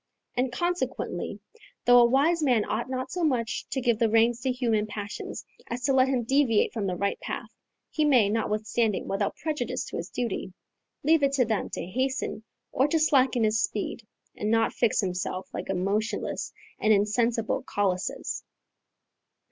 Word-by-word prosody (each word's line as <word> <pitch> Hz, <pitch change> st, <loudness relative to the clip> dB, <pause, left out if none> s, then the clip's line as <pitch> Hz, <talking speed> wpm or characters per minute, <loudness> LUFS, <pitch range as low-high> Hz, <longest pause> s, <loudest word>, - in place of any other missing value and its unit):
And, 250 Hz, 0 st, 0 dB
consequently, 350 Hz, +7 st, -2 dB, 0.5 s
though 245 Hz, 0 st, +8 dB
a 240 Hz, -, +7 dB
wise 310 Hz, +6 st, +3 dB
man 245 Hz, -7 st, +3 dB
ought -, -, -2 dB
not 260 Hz, 0 st, -3 dB
so 360 Hz, -, -2 dB
much 245 Hz, -7 st, 0 dB
to 265 Hz, -, -1 dB
give 235 Hz, -3 st, +1 dB
the 230 Hz, -, +3 dB
reins 230 Hz, +2 st, +3 dB
to 260 Hz, -, 0 dB
human 230 Hz, -4 st, 0 dB
passions 210 Hz, -1 st, -6 dB, 0.2 s
as 245 Hz, +1 st, -5 dB
to 275 Hz, -, +2 dB
let 260 Hz, 0 st, +5 dB
him 260 Hz, -3 st, 0 dB
deviate 255 Hz, -3 st, +2 dB
from 210 Hz, -4 st, -2 dB
the 180 Hz, -, -1 dB
right 200 Hz, +2 st, -1 dB
path, -, -, -5 dB, 0.4 s
he 310 Hz, -, +1 dB
may, 255 Hz, -8 st, +5 dB
notwithstanding, 215 Hz, 0 st, 0 dB
without 195 Hz, +1 st, -1 dB
prejudice 300 Hz, -7 st, -3 dB
to -, -, -6 dB
his 170 Hz, -, -5 dB
duty, 230 Hz, -6 st, -3 dB, 0.5 s
leave 315 Hz, +2 st, +4 dB
it 275 Hz, 0 st, +2 dB
to 260 Hz, -3 st, +3 dB
them 220 Hz, -2 st, -1 dB
to -, -, -3 dB
hasten 260 Hz, +2 st, -2 dB, 0.3 s
or 265 Hz, -, +2 dB
to 325 Hz, -, +1 dB
slacken 265 Hz, -6 st, +3 dB
his 215 Hz, 0 st, +2 dB
speed, 210 Hz, +2 st, -2 dB, 0.3 s
and 210 Hz, -, -2 dB
not 225 Hz, 0 st, +2 dB
fix 235 Hz, -1 st, +2 dB
himself 185 Hz, 0 st, -3 dB
like -, -, -5 dB
a 195 Hz, -, 0 dB
motionless 200 Hz, +4 st, -1 dB, 0.3 s
and 220 Hz, -, +3 dB
insensible 225 Hz, +2 st, +2 dB
Colossus. 190 Hz, -3 st, -2 dB
235 Hz, 170 wpm, -27 LUFS, 210-265 Hz, 0.5 s, though